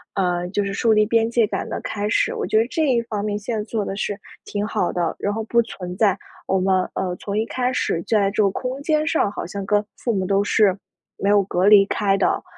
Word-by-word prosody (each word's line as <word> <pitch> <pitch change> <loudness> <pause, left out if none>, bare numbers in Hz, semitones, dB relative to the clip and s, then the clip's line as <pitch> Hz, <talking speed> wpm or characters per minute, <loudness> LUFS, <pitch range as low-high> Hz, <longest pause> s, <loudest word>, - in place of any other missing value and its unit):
呃， 180 -2 0
就 205 +1 -1
是 200 - -3
树 225 +2 +2
立 215 0 +4
边 230 +1 +1
界 230 -3 +3
感 - - -3
的 - - -3
开 205 0 -3
始。 - - +1
我 - - -2
觉 215 - +1
得 230 - +1
这 315 +1 0
一 235 -2 +3
方 210 -3 -4
面 210 -1 -2
现 220 +2 -3
在 210 - -2
做 215 -1 -3
得 195 - -4
是 205 0 -3 0.2
挺 205 0 -3
好 210 -5 -1
的， 170 -2 -1
然 205 - -2
后 225 - -3
不 235 +1 +3
存 180 -5 -7
在 200 -2 +2 0.3
我 190 - +1
们， 185 0 +2
呃， 180 -1 -2
从 205 0 -3
一 225 - 0
开 250 +1 -1
始 170 -9 -1
在 205 -3 +2
这 215 - +1
个 195 - +2
空 255 +5 -4
间 305 +1 +1
上 265 -11 +1
好 - - -5
像 200 +1 -5
跟 205 +1 +2
父 235 - -2
母 190 -2 -1
都 200 0 +2
是 205 -2 +3 0.4
没 200 - 0
有 205 -1 +5
隔 185 0 0
离 205 -1 +7
开 195 -1 +1
的， - - +1
205 Hz, 270 characters per minute, -22 LUFS, 195-225 Hz, 0.4 s, 离